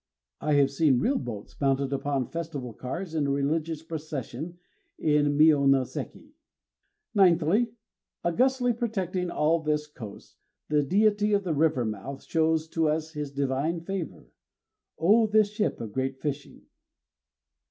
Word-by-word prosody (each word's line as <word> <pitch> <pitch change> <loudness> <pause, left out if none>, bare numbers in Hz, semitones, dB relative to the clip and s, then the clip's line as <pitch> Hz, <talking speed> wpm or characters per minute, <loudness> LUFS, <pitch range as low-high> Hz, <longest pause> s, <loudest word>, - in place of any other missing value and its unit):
I 150 0 0
have 140 -1 +4
seen 140 -3 +3
real 265 - +1
boats 110 -4 -7
mounted 135 0 +1
upon 140 -1 -1
festival 150 -8 -5
cars 165 - -5
in 150 -3 0
a - - 0
religious 155 +3 -1
procession 155 0 -6 0.4
at - - -11
Mionoséki. 145 -3 +2 0.8
Ninthly, 190 +4 +3 0.5
Augustly 245 +7 +2
protecting 190 -6 -2
all 165 0 +2
this 150 -1 0
coast, 115 -9 -11 0.3
the 150 0 +3
Deity 210 +6 +2
of 200 0 +2
the 175 -3 -1
river 150 -4 +2
mouth 110 +6 -5
shows 160 0 +1
to 160 -1 +1
us 155 +1 -1
his 150 -2 -4
divine 140 +4 -1
favor. 185 -1 -6 0.7
_O 215 +6 +4
this 215 -1 +4
ship 210 0 -1
of 110 -3 -6
great 130 0 -2
fishing! 145 -1 -5
155 Hz, 130 wpm, -27 LUFS, 140-175 Hz, 0.8 s, have